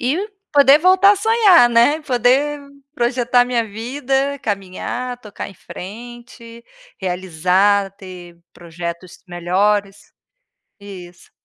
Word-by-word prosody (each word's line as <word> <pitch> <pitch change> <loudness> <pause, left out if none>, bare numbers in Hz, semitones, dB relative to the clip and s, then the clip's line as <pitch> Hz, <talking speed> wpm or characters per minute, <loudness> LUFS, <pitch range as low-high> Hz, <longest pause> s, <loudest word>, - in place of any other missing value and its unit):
E 265 +8 -1 0.3
poder 285 0 +6
voltar 375 +4 +5
a - - -2
sonhar, 405 - +4
né? 240 +7 +3
Poder 270 +3 +1 0.3
projetar 245 -1 +1
a 245 - +4
minha 245 -2 -1
vida, 270 +5 -3
caminhar, 220 +5 -5
tocar 210 -2 -8
em 195 - -14
frente, 235 +4 -12 0.4
realizar, 185 +2 0
ter 180 -3 -12 0.2
projetos 170 +1 -9
melhores 195 +3 -2 0.7
Isso. 180 -3 -13
235 Hz, 105 wpm, -18 LUFS, 190-265 Hz, 0.7 s, poder